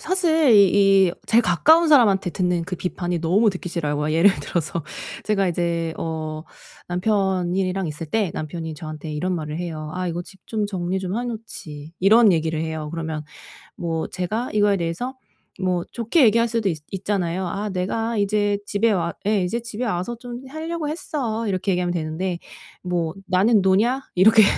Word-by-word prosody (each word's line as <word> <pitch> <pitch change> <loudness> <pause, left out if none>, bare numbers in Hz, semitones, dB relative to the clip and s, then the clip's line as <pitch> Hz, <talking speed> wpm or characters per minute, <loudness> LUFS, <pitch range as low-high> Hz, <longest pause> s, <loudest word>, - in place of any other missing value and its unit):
사실 325 -5 +2
이 195 -1 +6
이 170 - -1
제일 230 +2 +4
가까운 315 - +4
사람한테 205 -11 +5
듣는 180 0 0
그 180 0 -5
비판이 175 -1 -3
너무 200 +7 +3
듣기 185 -2 -6
싫어요. 150 -4 -2
뭐 150 +1 -1
예를 170 +5 +6
들어서 165 +2 -2 0.4
제가 195 -3 +1
이제 170 -1 -1
어 155 -1 -4 0.5
남편이랑 185 -1 0
있을 155 +1 -5
때 205 +1 0
남편이 160 +1 -5
저한테 155 0 -7
이런 180 +5 -1
말을 155 -1 -4
해요. 155 -3 -5
"아. 185 0 -2
이거 170 +1 -3
집 190 +1 -16
좀 215 -2 -1
정리 185 -1 -2
좀 185 +1 -3
해 245 - -2
놓지." 165 -10 -7
이런 210 +2 +6
얘기를 160 -1 0
해요. 160 -1 -3
그러면 160 -2 -4 0.5
뭐 165 -2 -2
제가 205 +7 -3
이거에 205 -1 +3
대해서 180 +10 -3 0.5
뭐 180 -2 0
좋게 240 +6 +2
얘기할 230 +1 +4
수도 225 -3 0
있 165 - -2
있잖아요. 190 -2 -1
"아. 205 +4 -3
내가 220 +5 -2
이제 205 0 +1
집에 215 +3 +1
와" 170 -4 0
예. 205 -2 +2
"이제 230 +7 -1
집에 230 +1 -4
와서 215 +2 -2
좀 245 0 -7
하려고 315 +1 -4
했어." 245 -8 -3
이렇게 190 0 0
얘기하면 180 -1 0
되는데 170 +2 -2 0.4
"뭐 175 -3 -1
나는 200 +4 +4
노냐?" 215 +8 +3
이렇게 215 +4 +7
185 Hz, 335 characters per minute, -22 LUFS, 170-215 Hz, 0.5 s, 이렇게